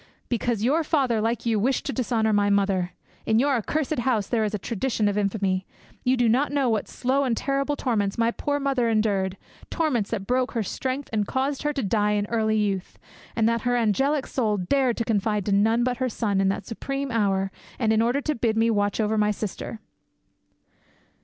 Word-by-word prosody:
Because 235 Hz, -2 st, -1 dB
your 300 Hz, +7 st, +2 dB
father, 265 Hz, -8 st, +1 dB
like 230 Hz, +2 st, -1 dB
you, 225 Hz, -2 st, +2 dB
wished 255 Hz, +6 st, 0 dB
to 280 Hz, -, -2 dB
dishonour 225 Hz, -4 st, +1 dB
my 205 Hz, 0 st, +3 dB
mother. 195 Hz, -3 st, +1 dB, 0.3 s
In 220 Hz, -, +3 dB
your 275 Hz, +4 st, +3 dB
accursed 300 Hz, +5 st, -1 dB
house 240 Hz, -5 st, +1 dB
there 225 Hz, 0 st, 0 dB
is 210 Hz, 0 st, -1 dB
a -, -, -1 dB
tradition 220 Hz, +1 st, -1 dB
of 205 Hz, -, 0 dB
infamy. 195 Hz, -2 st, 0 dB, 0.4 s
You 255 Hz, +1 st, +2 dB
do 240 Hz, -1 st, +3 dB
not 260 Hz, +7 st, +2 dB
know 280 Hz, -3 st, +1 dB
what 220 Hz, -2 st, 0 dB
slow 265 Hz, +3 st, 0 dB
and 240 Hz, -4 st, 0 dB
terrible 275 Hz, +1 st, 0 dB
torments 210 Hz, -8 st, -1 dB
my 230 Hz, 0 st, +2 dB
poor 285 Hz, +4 st, -2 dB
mother 270 Hz, -4 st, +1 dB
endured 200 Hz, -4 st, +1 dB, 0.3 s
torments 260 Hz, -11 st, 0 dB
that 205 Hz, -4 st, -3 dB
broke 255 Hz, +3 st, 0 dB
her 230 Hz, -3 st, 0 dB
strength 260 Hz, +7 st, -3 dB
and 210 Hz, -2 st, 0 dB
caused 270 Hz, +1 st, -1 dB
her 295 Hz, 0 st, 0 dB
to 275 Hz, -3 st, -2 dB
die 210 Hz, +1 st, +1 dB
in 205 Hz, -1 st, 0 dB
early 220 Hz, -1 st, +1 dB
youth, 195 Hz, -3 st, -2 dB, 0.4 s
and 225 Hz, -1 st, +2 dB
that 230 Hz, 0 st, +1 dB
her 245 Hz, +2 st, +1 dB
angelic 265 Hz, +5 st, +1 dB
soul 215 Hz, -5 st, 0 dB
dared 245 Hz, +7 st, +1 dB
confide 210 Hz, -2 st, 0 dB
to 205 Hz, -, -1 dB
none 220 Hz, +4 st, +3 dB
but 250 Hz, 0 st, 0 dB
her 255 Hz, 0 st, 0 dB
son 205 Hz, -4 st, 0 dB
in 195 Hz, -, +2 dB
that 195 Hz, +1 st, -2 dB
supreme 275 Hz, +3 st, -4 dB
hour 195 Hz, -4 st, +1 dB, 0.3 s
and 220 Hz, -3 st, +2 dB
in 220 Hz, -, +3 dB
order 245 Hz, +5 st, +1 dB
to 305 Hz, -, -1 dB
bid 230 Hz, -4 st, 0 dB
me 230 Hz, +1 st, +3 dB
watch 205 Hz, -1 st, 0 dB
over 215 Hz, 0 st, +1 dB
my 210 Hz, 0 st, +3 dB
sister." 215 Hz, +1 st, -4 dB
225 Hz, 205 wpm, -25 LUFS, 210-260 Hz, 0.4 s, my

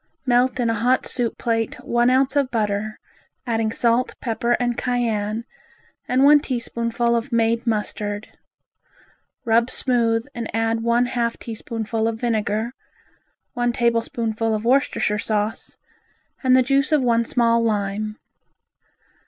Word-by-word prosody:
Melt 250 Hz, +1 st, +2 dB
in 240 Hz, -, +1 dB
a 225 Hz, -, +1 dB
hot 250 Hz, +2 st, +2 dB
soup 245 Hz, -3 st, -1 dB
plate 225 Hz, -1 st, -1 dB
one 240 Hz, +1 st, +2 dB
ounce 265 Hz, +2 st, +2 dB
of 280 Hz, -3 st, +2 dB
butter, 215 Hz, -2 st, -2 dB, 0.5 s
adding 225 Hz, -2 st, 0 dB
salt, 235 Hz, +2 st, +1 dB
pepper 235 Hz, 0 st, -1 dB
and 240 Hz, 0 st, 0 dB
cayenne, 230 Hz, -3 st, -1 dB, 0.6 s
and 255 Hz, +2 st, +2 dB
one 295 Hz, +1 st, +7 dB
teaspoonful 235 Hz, -3 st, -1 dB
of 235 Hz, +3 st, -2 dB
made 230 Hz, 0 st, +1 dB
mustard, 210 Hz, -1 st, -2 dB, 1.1 s
rub 230 Hz, +1 st, +3 dB
smooth 230 Hz, -3 st, +1 dB
and 235 Hz, -2 st, -5 dB
add 225 Hz, 0 st, 0 dB
one 235 Hz, +1 st, +2 dB
half 240 Hz, -2 st, -1 dB
teaspoonful 225 Hz, 0 st, -3 dB
of 225 Hz, -1 st, -3 dB
vinegar, 220 Hz, -1 st, -1 dB, 0.8 s
one 240 Hz, 0 st, 0 dB
tablespoonful 230 Hz, -2 st, 0 dB
of 215 Hz, +1 st, -4 dB
Worcestershire 245 Hz, -5 st, +2 dB
sauce 210 Hz, +1 st, -2 dB, 0.7 s
and 255 Hz, 0 st, +5 dB
the 255 Hz, -, +4 dB
juice 275 Hz, +4 st, +1 dB
of 300 Hz, -4 st, +3 dB
one 235 Hz, -1 st, +3 dB
small 230 Hz, 0 st, +2 dB
lime. 215 Hz, 0 st, -1 dB
235 Hz, 130 wpm, -22 LUFS, 225-245 Hz, 1.1 s, one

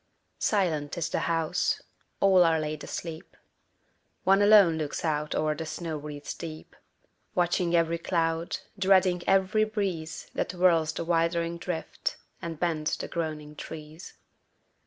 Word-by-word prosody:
Silent 165 Hz, -9 st, 0 dB
is 165 Hz, -2 st, -1 dB
the -, -, 0 dB
house: 165 Hz, +1 st, 0 dB, 0.4 s
all 190 Hz, -2 st, +6 dB
are 165 Hz, -1 st, +3 dB
laid 155 Hz, -1 st, -4 dB
asleep: 165 Hz, -2 st, -7 dB, 0.9 s
One 195 Hz, +1 st, +5 dB
alone 205 Hz, -6 st, +6 dB
looks 150 Hz, +2 st, -3 dB
out 150 Hz, -1 st, -1 dB
o'er 155 Hz, 0 st, +1 dB
the 160 Hz, +1 st, -6 dB
snow 165 Hz, 0 st, -4 dB
wreaths 150 Hz, -1 st, -6 dB
deep, 160 Hz, -2 st, -9 dB, 0.6 s
Watching 175 Hz, 0 st, +2 dB
every 165 Hz, 0 st, +2 dB
cloud, 165 Hz, -1 st, 0 dB, 0.2 s
dreading 185 Hz, -2 st, +4 dB
every 195 Hz, +3 st, +3 dB
breeze 195 Hz, -7 st, -3 dB
That -, -, -2 dB
whirls 170 Hz, -3 st, +3 dB
the 170 Hz, -, -4 dB
wildering 170 Hz, 0 st, +1 dB
drift, 180 Hz, -, -3 dB, 0.2 s
and 165 Hz, -3 st, -5 dB
bends 160 Hz, -3 st, 0 dB
the -, -, -5 dB
groaning 155 Hz, -2 st, -4 dB
trees. 155 Hz, +2 st, -9 dB
165 Hz, 135 wpm, -28 LUFS, 155-180 Hz, 0.9 s, all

